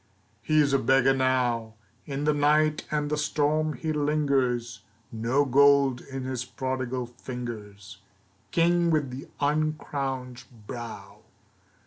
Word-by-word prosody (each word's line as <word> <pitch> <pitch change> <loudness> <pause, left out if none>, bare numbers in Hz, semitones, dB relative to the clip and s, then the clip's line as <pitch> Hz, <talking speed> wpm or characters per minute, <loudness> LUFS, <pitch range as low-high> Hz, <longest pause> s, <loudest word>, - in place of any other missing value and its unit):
He 155 0 +2
is 140 -2 +1
a 135 - +4
beggar 135 +2 +4
now. 125 -4 0 0.3
In 140 0 -3
the 150 0 +3
night 150 +1 +2
and 150 -1 -1
the 150 - 0
storm 155 +1 +1
he 155 +4 -3
lingers, 140 -6 0 0.3
No 120 +6 +1
gold 140 -1 +4
in 135 -1 -7
his 130 -1 -3
prodigal 130 -1 -3
fingers, 120 -5 -8 0.5
King 170 0 +2
with 150 -5 +1
the 130 +2 -8
uncrowned 140 -4 -2 0.2
brow. 120 0 -8
135 Hz, 120 wpm, -27 LUFS, 125-150 Hz, 0.5 s, a